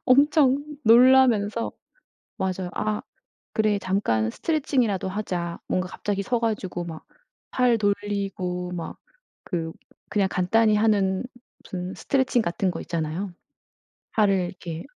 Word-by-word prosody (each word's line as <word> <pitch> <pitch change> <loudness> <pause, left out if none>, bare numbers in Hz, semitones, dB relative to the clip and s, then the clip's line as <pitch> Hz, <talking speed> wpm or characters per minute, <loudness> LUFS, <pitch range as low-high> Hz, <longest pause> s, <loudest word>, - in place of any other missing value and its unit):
엄청 280 +1 +4 0.2
놀라면서. 230 -2 +5 0.7
맞아요. 185 -1 -2
'아 210 0 -1 0.5
그래 215 -2 +2
잠깐 115 - 0
스트레칭이라도 255 - 0
하자.' 180 -4 -3
뭔가 185 0 0
갑자기 200 +1 -3
서 240 +4 0
가지고 205 -6 -2
막 160 -2 -8 0.5
팔 245 -3 +3
돌리고 195 -3 -2
막 170 -2 -6 0.5
그 165 -3 -3 0.4
그냥 200 -2 +2
간단히 215 +4 +3
하는 205 -3 +2 0.4
무슨 180 0 -5
스트레칭 260 -3 +1
같은 180 +1 0
거 165 - -6
있잖아요. 170 +4 -3 0.8
팔을 210 -2 +3
이렇게 170 -2 -7
200 Hz, 255 characters per minute, -25 LUFS, 180-230 Hz, 0.8 s, 놀라면서